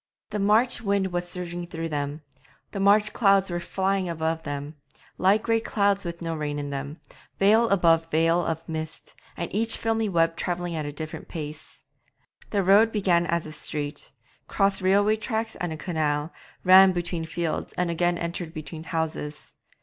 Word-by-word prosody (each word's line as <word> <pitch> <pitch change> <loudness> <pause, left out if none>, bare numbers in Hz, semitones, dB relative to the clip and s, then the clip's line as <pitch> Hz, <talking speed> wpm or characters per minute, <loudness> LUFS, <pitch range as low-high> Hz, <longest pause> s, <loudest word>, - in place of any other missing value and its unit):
The 210 - -2
March 215 +5 +3
wind 200 -3 0
was 175 0 -2
surging 175 -1 -4
through 165 -1 -5
them; 145 0 -3 0.5
the 200 - -5
March 205 +2 +4
clouds 195 -4 +3
were 175 - -1
flying 190 +1 -1
above 160 0 -2
them, 145 0 -5 0.5
light 200 +4 +3
grey 225 -1 +2
clouds 200 -3 +1
with 170 -1 -6
no 165 0 -2
rain 150 -2 -3
in 145 -1 -4
them, 140 +3 -5 0.4
veil 220 +4 +4
above 165 -4 +3
veil 165 +2 +2
of 165 0 -3
mist, 160 -1 -6 0.2
and 170 - -4
each 225 +3 +1
filmy 225 -1 0
web 165 -2 +2
travelling 175 -1 -3
at 155 -2 -3
a - - -4
different 155 +1 -7
pace. 155 -1 -8 0.7
The 200 -2 +1
road 205 +4 +5
began 180 -5 +2
as 170 0 0
a 155 - -7
street, 150 -1 -4 0.4
crossed 195 -1 +1
railway 205 +3 +3
tracks 220 0 -3
and 175 -3 -3
a 160 - -5
canal, 155 -2 -1 0.3
ran 190 +1 +8
between 175 -1 -3
fields, 165 0 -3
and 180 -1 -1
again 175 +1 +1
entered 170 -1 -5
between 155 +1 -7
houses. 155 -3 -4
175 Hz, 170 wpm, -25 LUFS, 160-195 Hz, 0.7 s, ran